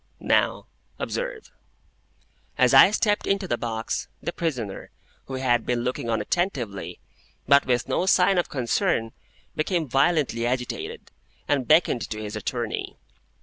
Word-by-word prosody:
Now, - - +1 0.3
observe. - - -4 1.1
As - - +4
I - - +9
stepped 210 0 0
into 195 -1 0
the 120 - 0
box, 115 -1 -3
the 170 - -4
prisoner, 125 - -4 0.4
who 135 - -6
had 120 -3 +1
been 120 -1 -1
looking 125 -2 -3
on 115 - +1
attentively, 130 - -2 0.5
but 140 -1 +5
with 125 -2 +1
no 185 - 0
sign 190 0 +4
of 175 - -1
concern, 115 -3 0 0.4
became 160 0 -1
violently 135 -3 +1
agitated, 125 0 -4 0.4
and 140 -4 0
beckoned 155 -6 +4
to 110 - -4
his 105 0 -6
attorney. 115 +1 -4
130 Hz, 135 wpm, -25 LUFS, 120-175 Hz, 1.1 s, I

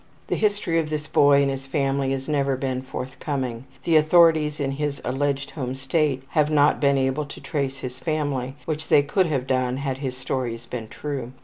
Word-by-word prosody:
The - - +1
history 205 -6 +1
of 155 -2 -2
this 155 0 -2
boy 145 -2 +5
and 140 - +1
his 135 0 -6
family 135 -1 0
has 135 0 -3
never 140 -3 +1
been 130 -1 -2
forthcoming. 130 -1 -4 0.2
The 165 -2 +4
authorities 155 -1 +4
in 140 -1 0
his 145 0 -2
alleged 140 +2 -1
home 130 -4 -4
State 135 -1 0
have 150 -1 +2
not 150 -1 +4
been 140 -1 +4
able 135 +3 0
to 145 - -10
trace 135 -2 -2
his 130 -1 -7
family, 145 -5 -2
which 155 -1 -3
they 145 - +5
could 185 +5 +1
have 135 -5 -1
done 130 -1 0
had 135 -1 -3
his 130 -2 -4
stories 120 -3 -3
been 115 -2 -6
true. 130 -1 -5
140 Hz, 195 wpm, -24 LUFS, 130-150 Hz, 0.2 s, boy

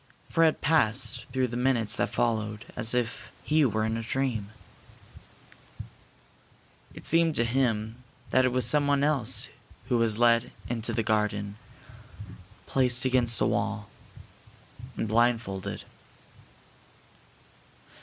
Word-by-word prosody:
Fred 165 -1 +2
passed 130 -5 +1
through 130 0 0
the 120 - -6
minutes 120 -3 +1
that - - 0
followed 110 -2 -2
as 120 0 +2
if 120 -2 -3
he 155 0 +2
were 110 -3 0
in 110 0 -1
a - - -3
dream. 115 -3 -2 2.5
It - - -11
seemed 165 -1 +3
to 120 - +2
him 115 -1 -1 0.3
that 130 - +4
it 130 - +2
was 125 -2 +1
someone 145 +2 +2
else 145 -6 0 0.4
who 120 -2 +2
was 110 -2 +2
led 120 +1 +3 0.2
into 115 0 -3
the 115 0 -1
garden, 105 -1 -1 1.1
placed 130 -1 +2
against 125 -3 +2
a - - +4
wall, 105 0 -2 1.1
and 110 - -2
blindfolded. 110 -4 0
120 Hz, 115 wpm, -27 LUFS, 110-130 Hz, 2.5 s, that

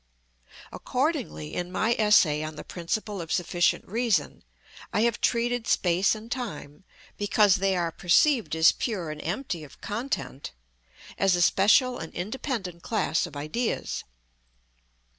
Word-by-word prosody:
Accordingly, 75 0 -2
in 180 0 -3
my 220 +5 +1
essay 185 -8 +4
on 155 0 -5
the - - -8
principle 195 +3 -4
of 165 - -7
sufficient 175 -1 +1
reason, 215 - 0 0.5
I 210 - +1
have 235 0 +1
treated 240 0 0
space 180 +4 +2
and 220 +2 -11
time, 205 - -6 0.3
because 205 -1 +3
they 195 0 +1
are 170 -2 -1
perceived 220 - +2
as 160 0 +6
pure 185 -10 -3
and 155 - -7
empty 175 - -3
of 145 - -14
content, 215 - -4 0.7
as 195 -2 +4
a 175 - 0
special 245 +8 +4
and 160 - -7
independent 195 - -4
class 215 -6 0
of - - -13
ideas. 185 +12 -2
190 Hz, 135 wpm, -26 LUFS, 165-225 Hz, 0.7 s, as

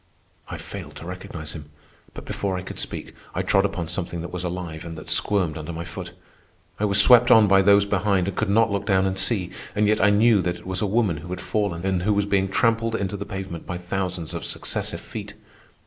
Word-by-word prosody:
I - - -5
failed - - -8
to - - -9
recognize 85 -3 -6
him, 75 -2 -9 0.5
but - - -8
before 95 -2 -2
I 90 - -5
could - - -7
speak - - -4 0.2
I - - 0
trod 95 +1 +3
upon 85 -4 -2
something 85 0 -3
that 85 - -7
was 90 -1 -3
alive 85 -3 -5
and 85 -1 -7
that 80 - -9
squirmed 90 -6 +1
under 80 +2 -6
my 85 0 -5
foot. - - -7 0.7
I 105 - +2
was 100 -1 +4
swept 120 +3 +7
on 110 -2 +7
by 95 0 +6
those 100 +1 +5
behind 100 -2 +1
and 100 - -3
could 110 - -1
not 115 +1 +3
look 100 0 -2
down 95 -2 +3
and 95 0 -1
see, 95 -3 +1 0.2
and 105 0 +3
yet 105 +1 +2
I 105 - +5
knew 105 0 +5
that 90 0 -2
it - - -16
was 95 0 -2
a 105 - +1
woman 100 -5 +1
who 80 +3 -9
had 90 - -4
fallen 100 -5 -2
and 95 -2 +1
who 105 +3 +1
was 100 0 +2
being 95 -1 +1
trampled 115 -1 +1
into 100 -2 -2
the 100 0 -5
pavement 95 -4 -6
by 90 - -3
thousands 90 -2 -3
of - - -4
successive - - -3
feet. - - -8
95 Hz, 235 wpm, -24 LUFS, 90-100 Hz, 0.7 s, swept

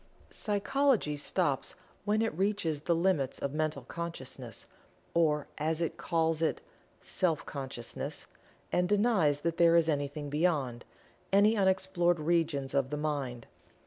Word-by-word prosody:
Psychology 225 - +1
stops 145 - -1 0.3
when 215 +1 +2
it 225 - -1
reaches 185 -5 0
the 170 +2 +1
limits 165 -6 +1
of 140 - -3
Mental 155 -3 -1
Consciousness, 130 - -6 0.5
or 150 -3 +2
as 160 +1 0
it 165 -1 -1
calls 165 -1 0
it 160 - +1 0.4
"Self 170 -4 0
Consciousness," 130 -4 -5 0.5
and 180 0 +1
denies 200 -9 +3
that 170 +1 -1
there 170 -1 +6
is 165 -1 +4
anything 145 -1 -1
beyond 145 -7 0 0.5
any 205 +3 +5
unexplored 190 -3 +2
regions 155 -4 0
of 135 -2 +1
the 150 - -3
Mind. 140 -6 -3
160 Hz, 130 wpm, -31 LUFS, 145-180 Hz, 0.5 s, there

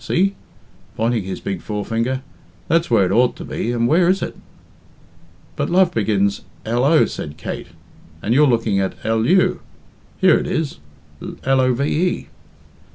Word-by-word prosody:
"See," 195 +3 +1 0.6
pointing 115 -2 0
his 95 - -5
big 95 -3 -4
forefinger, 115 +5 -2 0.4
"that's 165 +1 +2
where 115 -5 +4
it 90 - -1
ought 120 +4 +3
to - - -8
be, 120 - -3
and 120 -1 +1
where 170 +6 +4
is 190 +1 +1
it?" - - -5 1.2
"But - - -2
love 180 0 +3
begins 100 -2 +1 0.2
lo," 125 +8 +3
said 75 0 -7
Kate, - - -6 0.5
"and 110 - -1
you're 145 +3 +5
looking 115 -5 +1
at 95 -1 -1
lu. 115 +12 +2 0.6
Here 190 -3 +5
it - - -4
is 155 - -2 0.4
love." 130 -1 0
120 Hz, 140 wpm, -20 LUFS, 105-150 Hz, 1.2 s, you're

